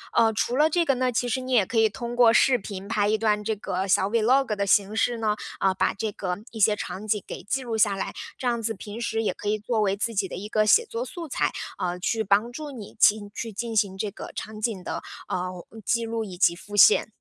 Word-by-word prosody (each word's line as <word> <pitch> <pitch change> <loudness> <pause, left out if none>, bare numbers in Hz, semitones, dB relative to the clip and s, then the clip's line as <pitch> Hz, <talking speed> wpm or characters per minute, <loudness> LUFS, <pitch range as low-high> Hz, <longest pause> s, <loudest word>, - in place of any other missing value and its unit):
呃， 225 -1 +5
除 235 +3 -1
了 300 +3 +4
这 340 +1 +1
个 275 - +3
呢， 255 0 0
其 245 +1 0
实 255 +2 -1
你 255 0 -4
也 215 -5 +5
可 225 +3 0
以 220 - +4
通 235 +4 -6
过 240 -2 +6
视 250 +1 +4
频 195 -1 -7
拍 205 -2 +1
一 215 +1 +2
段 210 -1 +1
这 220 0 -1
个 190 -1 -3
小 190 +1 +3
vlog 235 +1 +3
的 200 0 -1
形 200 +2 +3
式 235 +1 +1
呢， 215 -2 0 0.2
啊， 190 -1 +2
把 - - 0
这 210 +1 -3
个 180 -2 -3
一 225 - -8
些 210 0 +4
场 210 0 -6
景 210 -2 0
给 - - -7
记 265 +6 -2
录 235 -2 -3
下 205 -2 +3
来， 195 - -4 0.2
这 - - -7
样 235 -1 0
子 225 0 -1
平 210 +2 -8
时 225 -1 -1
也 - - 0
可 - - -8
以 215 - +1
作 220 +1 -1
为 195 -1 +1
自 230 +3 -2
己 195 -2 0
的 - - -7
一 200 +4 -6
个 215 -1 +2
写 460 - +5
作 465 +2 -4
素 345 -3 -7
材， - - 0 0.3
呃， 175 0 -2
去 220 +4 0
帮 205 +5 +2
助 295 +3 -7
你 225 -7 -9
进 205 -1 +4
去 225 +1 -5
进 230 +2 -4
行 200 -3 +1
这 205 0 -3
个 - - -9
场 215 0 -6
景 210 -5 -2
的， - - -4 0.3
呃， 180 -1 -4 0.2
记 235 -1 +1
录 225 0 -2
以 185 -3 -9
及 170 -2 +4
复 205 +3 -10
现。 205 - +6
215 Hz, 290 characters per minute, -25 LUFS, 200-235 Hz, 0.3 s, 过